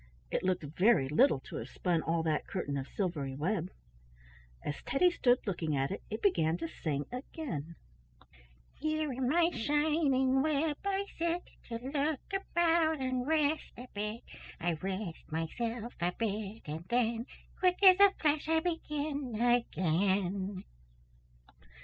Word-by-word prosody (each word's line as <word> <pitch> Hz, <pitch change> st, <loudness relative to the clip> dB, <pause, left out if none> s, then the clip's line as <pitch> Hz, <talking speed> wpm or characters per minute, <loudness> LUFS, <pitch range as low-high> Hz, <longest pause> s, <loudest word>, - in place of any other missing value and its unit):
It -, -, 0 dB
looked 185 Hz, -2 st, 0 dB
very 165 Hz, -, +3 dB
little 150 Hz, -, +4 dB
to -, -, -8 dB
have 115 Hz, -, -6 dB
spun 175 Hz, -3 st, 0 dB
all 165 Hz, 0 st, 0 dB
that 155 Hz, -2 st, 0 dB
curtain 145 Hz, -7 st, -3 dB
of 135 Hz, -1 st, -3 dB
silvery 150 Hz, -9 st, -2 dB
web. 175 Hz, +4 st, -1 dB, 1.0 s
As 145 Hz, -, -3 dB
Teddy 355 Hz, +6 st, +3 dB
stood 245 Hz, -7 st, +2 dB
looking 165 Hz, -7 st, -1 dB
at 135 Hz, +3 st, 0 dB
it, 195 Hz, -, -4 dB
it 215 Hz, -, -5 dB
began 165 Hz, -, +3 dB
to 165 Hz, -1 st, -3 dB
sing 145 Hz, -3 st, -3 dB
again: 245 Hz, -, -5 dB, 1.0 s
"Here 310 Hz, -1 st, -1 dB
in 250 Hz, 0 st, -1 dB
my 335 Hz, +3 st, +4 dB
shining 285 Hz, -2 st, +2 dB
web 300 Hz, 0 st, +1 dB
I 395 Hz, 0 st, 0 dB
sit, 340 Hz, +1 st, 0 dB, 0.2 s
To 230 Hz, -, -5 dB
look 290 Hz, +1 st, 0 dB
about 335 Hz, -4 st, +2 dB
and 255 Hz, -1 st, -1 dB
rest 310 Hz, -1 st, +1 dB
a 250 Hz, +2 st, -8 dB
bit. 210 Hz, +3 st, -3 dB, 0.4 s
I 175 Hz, 0 st, 0 dB
rest 185 Hz, +1 st, -5 dB
myself 225 Hz, +9 st, -3 dB
a 175 Hz, +1 st, +2 dB
bit 215 Hz, 0 st, -3 dB
and 155 Hz, +2 st, -5 dB
then, 235 Hz, 0 st, +1 dB, 0.3 s
Quick 365 Hz, -1 st, +3 dB
as 375 Hz, -1 st, +9 dB
a 400 Hz, 0 st, +9 dB
flash, 305 Hz, 0 st, +1 dB
I 325 Hz, 0 st, +4 dB
begin 295 Hz, -7 st, -3 dB
again." 195 Hz, -4 st, +1 dB
235 Hz, 145 wpm, -32 LUFS, -, 1.0 s, as